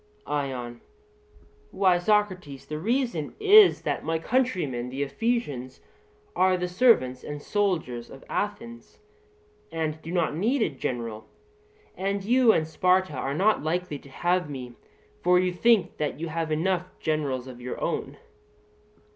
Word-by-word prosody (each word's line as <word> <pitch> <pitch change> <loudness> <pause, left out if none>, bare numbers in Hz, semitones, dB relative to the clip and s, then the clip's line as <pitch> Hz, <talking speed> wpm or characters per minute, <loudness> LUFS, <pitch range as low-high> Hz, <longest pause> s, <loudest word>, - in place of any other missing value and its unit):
ION: 125 -4 -3 0.9
Why, 185 -2 +3
Socrates, 185 -8 0
the 150 0 -5
reason 230 - -1
is, 420 -1 +7
that - - -2
my 165 +1 0
countrymen, 165 - -1
the 135 +2 -2
Ephesians, 140 - -2 0.6
are 185 0 +3
the 180 0 -2
servants 180 - +3
and 145 0 -6
soldiers 155 - -1
of 135 - -12
Athens, 230 +3 -5 0.7
and 160 -1 -3
do 165 - -7
not 170 -4 0
need 225 - +1
a - - +1
general; 115 -5 -4 0.7
and 195 +1 -2
you 240 +2 +5
and 155 -6 +1
Sparta 185 +3 +2
are 135 +1 -3
not 210 +6 +3
likely 160 -1 -2
to 140 - -16
have 175 +3 0
me, 125 -3 -7 0.5
for 180 +1 +4
you 180 0 +1
think 205 -2 +3
that 150 -1 -2
you 165 0 -4
have 165 0 -3
enough 180 +3 -1
generals 145 -5 -1
of 125 -2 -10
your 125 0 -5
own. - - -3
165 Hz, 140 wpm, -26 LUFS, 140-200 Hz, 0.9 s, is